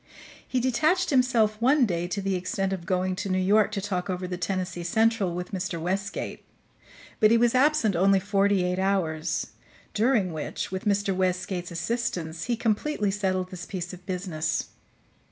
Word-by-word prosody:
He 255 - 0
detached 310 +9 +2
himself 235 -5 +2
one 265 +2 +5
day 175 -4 -1
to 200 +2 -3
the 195 0 0
extent 190 +1 -1
of 170 -3 -6
going 185 0 0
to 200 - -3
New 185 - +1
York 205 +3 +3
to 200 - -2
talk 185 -2 -3
over 180 0 -2
the 180 - -3
Tennessee 180 -1 -3
Central 205 0 +1
with 180 0 -5
Mr. 190 -2 -3
Westgate; 195 +4 -3 0.8
but 215 - +6
he 230 - +5
was 235 0 +3
absent 260 - +3
only 195 +2 +4
forty 200 -1 +2
eight 180 +1 -1
hours, 165 -4 -1 0.4
during 215 -5 +2
which, 155 +3 -4
with 190 0 -4
Mr. 200 -1 +1
Westgate's 180 -1 -1
assistance, 170 -3 -3
he 245 - 0
completely 220 -1 0
settled 185 -2 -1
this 175 -2 -7
piece 180 -2 -5
of 180 0 -11
business. 175 -4 -2
190 Hz, 170 wpm, -26 LUFS, 180-215 Hz, 0.8 s, but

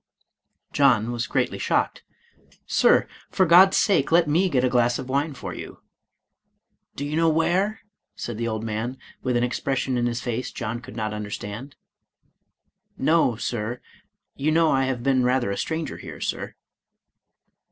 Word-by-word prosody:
*' - - -45
John 120 -5 +3
was 120 -1 -3
greatly - - -1
shocked. - - 0 0.4
" - - -32 0.2
Sir, - - +3 0.2
for 190 - +2
God's 180 +3 +7
sake, 170 -8 +2
let 170 0 +5
me 175 +6 +2
get 130 -6 +1
a - - +4
glass 120 -1 +2
of 130 -1 -7
wine 140 +2 0
for - - -6
you." - - -9 1.1
"Do 140 - -4
you 150 +1 -3
know 165 0 +3
where?" 180 +7 +1 0.3
said 115 -2 -6
the 115 - -1
old 110 -1 -3
man, 115 +4 -3 0.2
with 125 -2 0
an 120 - +1
expression 130 0 -1
in 120 - +1
his 120 -1 -2
face 120 0 -3
John 115 +2 -4
could 115 - -11
not 110 -2 -3
under 105 0 -5
stand. 105 +7 -7 0.6
" - - -50
No, 160 -8 +3
Sir; 115 +1 -3 0.6
you 150 +3 0
know 165 0 +3
I 135 0 +2
have 130 -2 -2
been 130 -1 +2
rather 125 -4 +1
a - - -2
stranger 160 0 -3
here. - - -9
Sir." - - -4
130 Hz, 175 wpm, -24 LUFS, 120-155 Hz, 1.1 s, God's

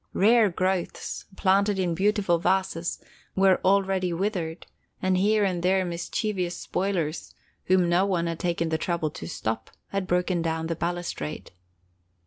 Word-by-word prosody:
Rare 220 +2 +5
growths, 185 0 -2
planted 200 +1 +2
in 180 -3 0
beautiful 195 -1 +2
vases, 180 -1 0 0.4
were 190 -1 +4
already 190 -1 +2
withered 175 -2 -2 0.3
and 185 0 +1
here 210 +3 +3
and 185 -3 0
there 185 +1 +2
mischievous 180 +1 -2
spoilers, 175 -5 -2 0.3
whom 185 -1 +3
no 175 +2 +3
one 185 -4 0
had 165 -1 -3
taken 170 -2 0
the 160 0 0
trouble 165 -3 -1
to 80 - -8
stop, 110 +5 -3 0.2
had 195 -2 -2
broken 180 -1 +1
down 160 0 -1
the 165 0 -2
balustrade. 170 -2 -4
180 Hz, 140 wpm, -26 LUFS, 170-195 Hz, 0.4 s, Rare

